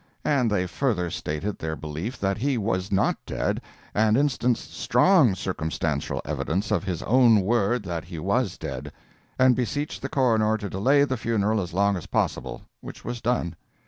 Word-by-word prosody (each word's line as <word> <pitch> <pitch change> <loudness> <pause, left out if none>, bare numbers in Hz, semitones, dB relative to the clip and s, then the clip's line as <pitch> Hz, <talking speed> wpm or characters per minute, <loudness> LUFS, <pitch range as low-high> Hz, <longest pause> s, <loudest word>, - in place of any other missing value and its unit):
And 130 -5 +2
they 105 -3 +1
further 90 - -1
stated 75 +8 -3
their 80 0 -3
belief 80 - -5
that 100 +1 0
he 135 +1 +1
was 100 -4 -1
not 95 - +1
dead, - - -2 0.3
and 110 +1 +3
instanced 125 -4 0
strong 125 - +4
circumstantial 80 -5 -2
evidence 95 +7 -2
of 100 -6 +1
his 90 -4 -3
own 120 -4 +5
word 115 +3 +1
that 85 -4 -4
he 85 -1 -8
was 100 +4 0
dead—and 75 - -2
beseeched 145 +5 -2
the 135 - -4
coroner 110 -5 +2
to 105 -3 -6
delay 135 +9 +3
the 130 -2 -1
funeral 110 -2 +1
as 90 - -5
long 100 +1 +3
as 85 - -8
possible, - - -2 0.2
which - - -10
was 120 -1 -4
done. 115 -9 0
105 Hz, 165 wpm, -25 LUFS, 90-125 Hz, 0.3 s, own